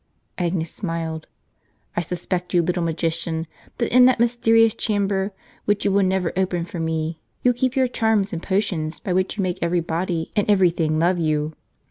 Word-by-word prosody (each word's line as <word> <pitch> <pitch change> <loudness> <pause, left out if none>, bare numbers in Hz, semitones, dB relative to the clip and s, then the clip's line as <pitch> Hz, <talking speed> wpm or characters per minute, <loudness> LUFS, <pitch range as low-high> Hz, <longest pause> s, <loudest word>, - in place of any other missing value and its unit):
(Agnes 170 -2 -1
smiled.) 165 -4 -4 0.7
"I - - +1
suspect, 180 +1 -3
you 175 - +4
little 180 +1 0
magician, 165 0 -1 0.3
that 235 0 -1
in 250 0 +8
that 255 -2 +4
mysterious 225 -2 +4
chamber, 200 -2 0 0.4
Avhich 205 0 +1
you 200 - +3
will 200 +1 +3
never 185 -2 +1
open 180 -2 0
for 175 0 -7
me, 160 0 -2 0.2
you 250 - +4
keep 255 +1 0
your 260 -1 +3
charms 220 -5 +1
and 165 - -3
potions 185 -6 -1
by 185 - -2
which 185 +3 0
you 200 - 0
make 185 0 -2
every 170 +1 +1
body 165 0 -2
and 205 -1 +1
every 190 -4 +5
thing 155 -2 0
love 175 +2 +2
you. 155 -1 0
180 Hz, 180 wpm, -22 LUFS, 165-205 Hz, 0.7 s, in